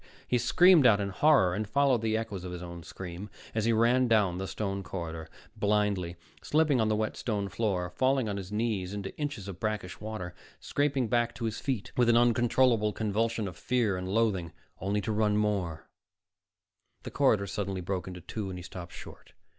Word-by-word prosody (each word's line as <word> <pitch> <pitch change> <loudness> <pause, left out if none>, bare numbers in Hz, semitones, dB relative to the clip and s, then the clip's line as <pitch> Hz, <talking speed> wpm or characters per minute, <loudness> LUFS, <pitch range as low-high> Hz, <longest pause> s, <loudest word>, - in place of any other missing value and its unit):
_ - - -29 0.2
He 125 - +2
screamed 165 +4 +6
out 105 -3 +5
in 100 -1 -1
horror, 100 - +4
and 105 +2 -3
followed 140 -3 +3
the 110 -1 +1
echoes 105 -5 -4
of 90 - -6
his 90 0 -6
own 85 -1 -8
scream 90 +4 -8 0.2
as 110 -1 0
he 115 - +3
ran 120 +3 +3
down 100 -6 +2
the 95 - -3
stone 100 -1 -3
corridor, 80 -4 -6 0.3
blindly, 100 -4 0 0.3
slipping 150 -5 +2
on 110 - +2
the 110 - +2
wet 110 0 -1
stone 100 -4 -2
floor, 95 -6 -1
falling 130 0 +1
on 100 - -2
his 95 0 -7
knees 105 -3 -1
into 100 -1 -6
inches 145 -10 -4
of 95 -3 -7
brackish 105 -4 -3
water, 105 -5 -5 0.3
scraping 140 -4 0
back 120 +1 +1
to 120 - -4
his 110 -1 -3
feet 130 -7 -3
with 120 -1 +3
an 120 - +5
uncontrollable 120 -2 +3
convulsion 110 0 -1
of 90 - -7
fear 120 -3 0
and 90 0 -4
loathing, 95 -6 0 0.3
only 100 +2 -1
to 110 - -2
run 105 -1 +2
more 95 -7 -1 1.2
The - - -7
corridor 110 -8 +3
suddenly 100 -1 -3
broke 95 +1 -3
into 90 -1 -7
two 105 +3 -5
and 90 - -6
he 90 - -8
stopped 85 0 -9
short. - - -12
105 Hz, 195 wpm, -29 LUFS, 95-115 Hz, 1.2 s, screamed